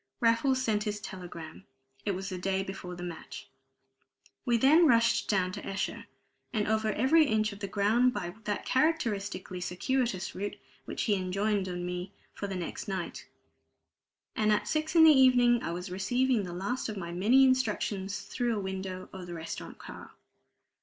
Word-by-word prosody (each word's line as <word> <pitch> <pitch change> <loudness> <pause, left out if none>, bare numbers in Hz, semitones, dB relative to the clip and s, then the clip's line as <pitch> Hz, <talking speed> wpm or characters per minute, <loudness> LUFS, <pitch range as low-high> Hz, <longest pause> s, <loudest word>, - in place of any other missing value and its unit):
Raffles 250 +2 +3
sent 215 -4 0
his 210 -1 -2
telegram 175 -3 -9 0.4
it 200 - +1
was 190 +1 -4
the 185 - -4
day 190 +1 0
before 190 -2 -7
the 175 - -7
match. 175 -2 -8 1.0
We 240 -2 +3
then 310 +8 +6
rushed 230 -3 +3
down 185 -3 +2
to - - -7
Esher, 195 0 -4 0.4
and 215 -4 0
over 220 0 +1
every 305 +8 +4
inch 215 -2 +1
of 200 - -11
the 200 - -4
ground 220 +6 +3
by 180 -6 -4
that 205 -1 -2
characteristically 215 - 0
circuitous 190 +2 -1
route 205 +2 -4 0.3
which - - -3
he 215 - +2
enjoined 195 +1 0
on 175 0 -4
me 180 +2 -5 0.2
for 200 - -5
the 195 - -4
next 180 +3 -5
night. 190 -3 -4 1.1
And 215 -1 +2
at 210 - +1
six 315 +2 -1
in 325 - +8
the 320 - +9
evening 245 -3 +5
I - - -3
was 180 +2 -5
receiving 235 +4 +1
the 175 - -6
last 200 +8 -3
of 210 - -5
my 170 -2 -5
many 215 +10 +4
instructions 210 -6 0
through 240 -2 -2
a - - -2
window 190 -1 -5
of 185 -2 -8
the 175 - -6
restaurant 160 -1 -7
car. - - -10
205 Hz, 175 wpm, -30 LUFS, 185-240 Hz, 1.1 s, the